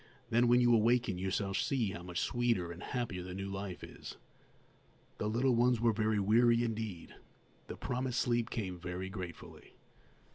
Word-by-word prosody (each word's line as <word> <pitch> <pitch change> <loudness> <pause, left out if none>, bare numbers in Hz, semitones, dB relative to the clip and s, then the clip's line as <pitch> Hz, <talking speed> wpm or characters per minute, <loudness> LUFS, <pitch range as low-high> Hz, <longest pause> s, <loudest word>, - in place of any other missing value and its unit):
Then, 120 +2 +4
when 120 +1 +5
you 120 -1 +5
awaken, 115 -3 +3
you 95 +1 -1
shall 95 0 -1
see 115 0 0
how 85 - -7
much 90 0 -3
sweeter 115 -8 0
and 85 +1 -9
happier 120 -8 -3
the 90 0 -7
new 100 0 -4
life 95 -2 -5
is." - - -9 1.0
The 105 - -1
little 125 +4 +2
ones 120 0 +3
were 115 -1 +3
very 110 0 +1
weary 115 +4 +4
indeed. 110 -6 -4 0.5
The - - -7
promised 125 0 -2
sleep 120 -1 +1
came 95 -5 -4
very 90 +2 -5
gratefully. 90 -4 -9
110 Hz, 170 wpm, -33 LUFS, 95-120 Hz, 1.0 s, when